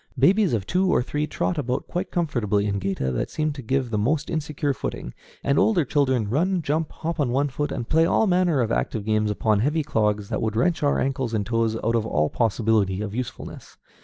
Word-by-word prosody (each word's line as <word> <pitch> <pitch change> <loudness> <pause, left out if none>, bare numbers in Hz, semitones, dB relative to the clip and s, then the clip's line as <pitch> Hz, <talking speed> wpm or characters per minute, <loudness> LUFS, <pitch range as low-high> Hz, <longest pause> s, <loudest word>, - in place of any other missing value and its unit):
Babies 190 - +4
of 105 -4 -1
two 185 - +1
or 125 - +3
three 150 +3 -2
trot 170 0 -1
about 130 0 -2
quite 180 - -3
comfortably 115 - 0
in 100 -1 -1
géta 95 -10 -2
that - - -2
seem 155 -1 -1
to 140 - -8
give 130 0 -1
most 130 +9 0
insecure 150 -2 -1
footing, 60 - -5 0.3
and 140 0 +2
older 185 -9 +3
children 130 -6 +1
run, 170 - 0
jump, 155 +2 -1
hop 165 +1 -4
on 140 -4 +1
one 140 +4 +1
foot, 145 +2 -3
and 115 - -4
play 160 +1 +3
all - - +3
manner 180 -7 +2
of 115 -1 -1
active 110 -3 -1
games 110 -1 +1
upon 105 0 +1
heavy 150 +7 +1
clogs 105 -6 0
that 110 - -2
would 110 -1 -1
wrench 160 +9 +1
our 145 -1 +2
ankles 130 -4 -1
and 105 -2 -1
toes 115 0 0
out 115 +2 +1
of 115 -1 0
all 75 -6 +1
possibility 110 -3 +1
of 105 -1 -4
usefulness. 125 +1 -7
125 Hz, 215 wpm, -24 LUFS, 110-150 Hz, 0.3 s, Babies